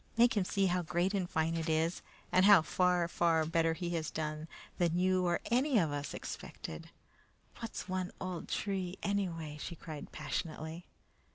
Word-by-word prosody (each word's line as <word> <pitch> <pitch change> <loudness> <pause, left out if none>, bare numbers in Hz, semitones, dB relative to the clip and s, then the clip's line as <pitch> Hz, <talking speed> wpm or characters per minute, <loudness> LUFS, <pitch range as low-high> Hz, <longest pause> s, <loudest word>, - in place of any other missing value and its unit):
Make 235 0 +5
him 200 -3 +2
see 195 +1 +1
how 180 -1 +2
great 175 +3 0
and 185 -3 0
fine 160 +1 +1
it 165 0 -2
is, 160 +2 +1 0.3
and 185 +1 +5
how 200 -5 +8
far, 180 +1 +2
far 165 -2 +2
better 165 0 +2
he 175 0 -3
has 160 -3 -1
done 155 0 -3 0.3
than 170 -1 +2
you 185 0 +3
or 175 - +2
any 255 +2 +3
of 165 -7 +3
us 145 0 -3
expected! - - -7 0.7
What's 230 -3 -5
one 185 -1 -2
old 180 -2 -4
tree, 190 -2 -2
anyway?" 165 -7 -2
she 170 - -5
cried 155 -3 -8
passionately. 160 +1 -4
175 Hz, 170 wpm, -33 LUFS, 160-185 Hz, 0.7 s, how